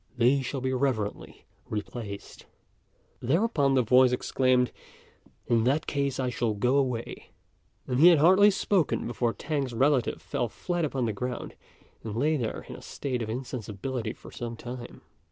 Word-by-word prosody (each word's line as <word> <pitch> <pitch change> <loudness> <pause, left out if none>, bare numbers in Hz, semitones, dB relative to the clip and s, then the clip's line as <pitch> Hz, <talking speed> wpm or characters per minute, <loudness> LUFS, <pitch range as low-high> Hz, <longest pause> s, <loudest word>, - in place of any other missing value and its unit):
They 125 +4 +4
shall 135 +1 -4
be 130 0 -1
reverently 125 -6 -2 0.2
replaced." 105 -1 -6 0.7
Thereupon 145 - +2
the 130 - +4
voice 125 +2 +5
exclaimed, 125 0 +2 0.7
"In 115 -1 +2
that 145 +5 +2
case, 140 -2 -1
I 130 -1 0
shall 115 -2 -1
go 125 +7 +2
away;" 125 -4 -2 0.6
and 125 0 -1
he 165 - +8
had 175 -2 +8
hardly 190 +7 +6
spoken 195 -5 +1
before 120 0 0
T'ang's 140 -2 -3
relative 135 0 +2
fell - - -2
flat 175 -2 -2
upon 135 -4 -1
the 110 - -1
ground 125 +4 -4 0.5
and 110 -2 -5
lay 150 +5 +2
there 120 -6 -3
in - - -8
a - - -11
state 130 -3 -4
of 110 - -4
insensibility 120 -1 -4
for - - -14
some 120 -1 -5
time. 120 0 -8
125 Hz, 155 wpm, -28 LUFS, 120-140 Hz, 0.7 s, he